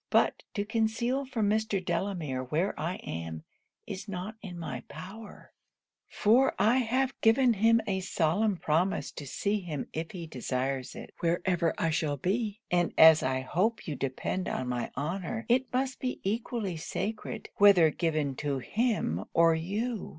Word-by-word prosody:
But - - +3
to 205 -1 -1
conceal 230 +5 0
from 230 -5 0
Mr. 215 0 +1
Delamere 170 -7 -2
where 160 +10 0
I 170 +4 -2
am, 80 -1 -5 0.4
is 190 +2 -6
not 200 +2 -5
in 180 -4 -8
my 140 -7 -5
power; 195 +8 -10 0.5
for 240 +6 +3
I 235 +4 +4
have 260 +2 +1
given 235 +2 +5
him 225 +2 +4
a 190 -2 -1
solemn 185 +3 +1
promise 175 +6 0
to 145 - -8
see 205 +9 -1
him 160 -7 -5
if 160 +1 -3
he 175 -3 -7
desires 130 -2 -3
it, - - -9
wherever 170 0 +1
I 165 - +1
shall 150 -2 0
be: 210 - -1
and 175 -1 +1
as 160 -1 +9
I 130 0 0
hope 190 - 0
you 150 - -2
depend 140 +8 -2
on 130 - -2
my 120 -1 -2
honour, 185 - -3
it 255 +2 +2
must 265 +1 -1
be 255 -1 -3
equally 210 -3 -2
sacred 205 +6 -4
whether 190 -6 +7
given 155 -4 -1
to 145 -2 -1
him 165 - -1
or 165 0 +6
you. 205 +7 -2
185 Hz, 160 wpm, -29 LUFS, 155-220 Hz, 0.5 s, as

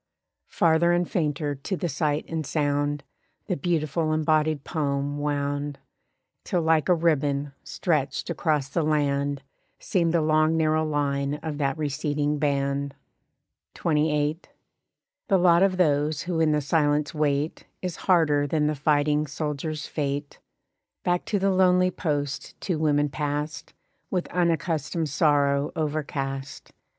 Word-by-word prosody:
Farther 170 +1 +3
and 175 0 +1
fainter 150 -3 -1
to 145 +7 -4
the 175 - -2
sight 150 -1 -1
and 160 -1 -3
sound 145 -1 -1 0.4
The 185 - -1
beautiful 155 0 0
embodied 155 -1 +1
poem 145 -2 -2
wound; 145 0 -2 0.7
Till 175 -2 0
like 160 +1 +2
a 180 - +6
ribbon, 145 -4 0
stretched 150 -6 -1
across 150 -3 0
the 165 +4 -1
land 145 -2 0 0.3
Seemed 170 -3 0
the 170 -1 +2
long 155 +1 +3
narrow 155 0 +2
line 145 -2 -1
of 155 -2 -4
that 135 -1 0
receding 145 0 -1
band. 140 -1 -1 0.8
XXVIII. 150 -1 +1 0.9
The 195 - +4
lot 175 -1 +5
of 190 -1 +3
those 150 -2 +2
who 170 -1 -2
in 160 -1 +3
the 150 0 +2
silence 145 +1 +1
wait 150 0 -1 0.2
Is 180 -2 -3
harder 150 -6 +4
than 150 +1 +1
the 150 - +1
fighting 150 +1 +1
soldiers' 150 +1 -4
fate. 145 -1 -3 0.6
Back 175 0 0
to 210 - 0
the 195 0 +2
lonely 185 -1 +4
post 145 -5 -3
two 175 -5 -2
women 145 -2 +2
passed, 145 +1 -4 0.3
With 180 -2 -1
unaccustomed 165 -2 0
sorrow 145 0 +2
overcast. 145 -3 -4
150 Hz, 130 wpm, -25 LUFS, 145-160 Hz, 0.9 s, a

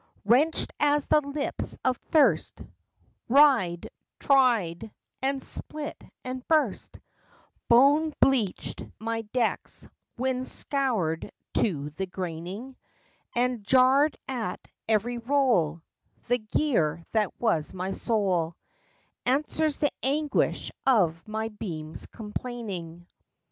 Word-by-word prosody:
Wrenched 270 +9 +3
as 290 0 +3
the 300 - +4
lips 280 0 -3
of 255 -1 +3
thirst, 310 -3 +3 0.7
Wried, 245 - +4 0.3
dried, 225 -8 +2 0.3
and 270 0 -1
split 305 +1 -4 0.2
and 255 0 -5
burst, 315 -2 0 0.7
Bone 285 +6 +5
bleached 235 -9 +1
my 225 +1 -2
decks, 225 +1 -2 0.3
wind 255 +1 -1
scoured 220 - -1 0.2
to 150 -8 0
the 190 +6 -4
graining; 185 +8 -6 0.6
And, 245 -2 0
jarred 265 +6 +4
at 230 -8 -4 0.2
every 230 +3 +1
roll, 230 - +1 0.4
The 245 +1 +1
gear 210 - 0
that 215 -2 0
was 165 -10 +1
my 185 0 -4
soul 190 -8 0 0.7
Answers 300 +3 +1
the 290 - +1
anguish 290 +2 0 0.2
of 180 -10 +3
my 220 +1 -3
beams' 165 -8 -6
complaining. 210 -7 -6
235 Hz, 100 wpm, -27 LUFS, 185-270 Hz, 0.7 s, Bone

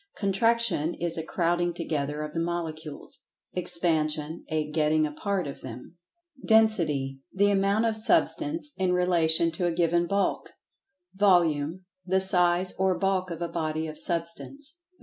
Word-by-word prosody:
Contraction 200 -5 +1
is 170 -1 -1
a 160 - -2
"crowding 175 +1 -1
together" 150 -3 -3
of 150 0 -7
the 165 - -2
Molecules; 165 -3 -5 0.3
Expansion 160 -3 0
a 155 -1 -1
"getting 155 0 +2
apart" 185 +5 -2
of 140 - -8
them. 125 +6 -10 0.5
Density: 165 - +2
The 205 +1 +2
amount 200 +3 +2
of 225 -1 0
Substance 310 +3 +1
in 185 -1 +1
relation 170 -2 +3
to 175 +2 -2
a - - 0
given 170 0 +1
bulk. 200 +1 -1 0.6
Volume—the 180 0 +1
"size" 180 -1 +4
or[Pg 190 -1 +2
83] - - -8
"bulk" 190 -1 0
of 170 -1 -7
a - - -2
body 160 -1 -2
of 155 -1 -8
Substance. 270 - -3
175 Hz, 140 wpm, -26 LUFS, 160-190 Hz, 0.6 s, size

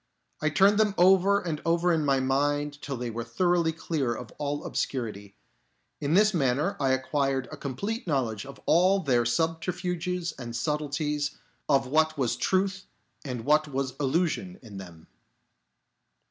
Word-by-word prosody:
I 155 - +2
turned 200 +6 +4
them 210 -2 +2
over 190 +2 +5
and 160 -5 -4
over 170 +1 +2
in 160 -2 +1
my 135 -2 +2
mind 145 +2 0
till 140 -3 -4
they 120 -1 -4
were 115 +1 -4
thoroughly 170 +7 +1
clear 150 -6 -2
of 120 +1 -8
all 145 0 -2
obscurity. 105 -6 -4 0.6
In 150 +3 0
this 210 +2 +5
manner 145 +4 +1
I 135 -2 +1
acquired 135 0 0
a - - -7
complete 195 - -4
knowledge 120 -9 -1
of 140 0 -11
all 185 +4 +4
their 125 -7 +2
subterfuges 175 +4 -1
and 120 -2 -6
subtleties, 150 +2 -2 0.3
of 135 -1 +4
what 155 +3 +2
was 130 -4 0
truth 190 0 0 0.4
and 125 -4 -5
what 150 +1 +3
was 135 -2 -2
illusion 170 +6 0
in 105 -4 -10
them. 85 -4 -12
150 Hz, 150 wpm, -27 LUFS, 130-175 Hz, 0.6 s, over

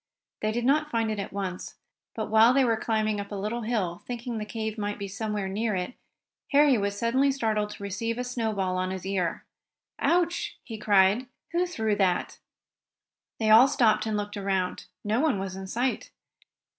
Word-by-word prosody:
They 215 - +1
did 240 +2 -2
not 300 +3 +3
find 225 -3 0
it 215 - -3
at 200 - -4
once, 190 -2 -5 0.4
but 220 -1 -4
while 225 +3 +6
they 270 -1 +5
were 230 -2 +3
climbing 215 -2 0
up 200 0 -6
a - - -3
little 210 +4 -3
hill, 210 -7 -2
thinking 240 -1 -4
the 210 - -4
cave 220 -1 -3
might 205 -1 -3
be 200 - -5
somewhere 205 0 -3
near 210 +2 -1
it, 180 +5 -3 0.6
Harry 285 -1 +6
was 200 -2 -1
suddenly 260 +5 +2
startled 220 -6 0
to 205 - -9
receive 225 +4 -2
a 250 - -1
snowball 220 -7 -1
on 185 0 -1
his 190 -1 -5
ear. 185 -4 -1 0.5
"Ouch!" 345 0 +1
he 225 -3 -7
cried. 205 +4 +4 0.2
"Who 350 +1 +1
threw 220 -11 0
that?" 185 -3 0 1.0
They 220 -1 +2
all 230 +5 +9
stopped 230 -5 +2
and 215 -1 0
looked 205 0 -4
around. 190 -3 -1 0.2
No 215 +3 +1
one 300 -6 +2
was 190 -1 -4
in 190 0 -7
sight. 245 +6 -1
215 Hz, 185 wpm, -27 LUFS, 200-235 Hz, 1.0 s, all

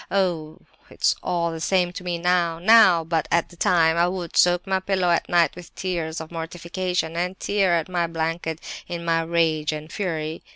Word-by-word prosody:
"Oh! 170 -5 -1 0.3
it's - - +1
all 170 -2 -1
the 165 - -6
same 180 0 +1
to 180 - -7
me 175 -1 -2
now—now! 175 +2 +4
But 160 -1 -1
at 170 0 +1
that 175 - -17
time 165 -2 +3
I 170 +1 +3
would 180 -2 -5
soak 175 0 +4
my 190 -1 0
pillow 190 -2 0
at 170 - 0
night 175 -1 +3
with 175 0 -12
tears 170 -4 -3
of 160 0 -9
mortification, 170 0 -3
and 180 +2 -2
tear 195 -4 +1
at 165 -2 -1
my 175 -2 -1
blanket 165 0 -3 0.3
in 170 -1 -5
my 165 0 +2
rage 160 -2 0
and 155 +1 -7
fury. 160 -5 -3
170 Hz, 190 wpm, -23 LUFS, 165-180 Hz, 0.3 s, now—now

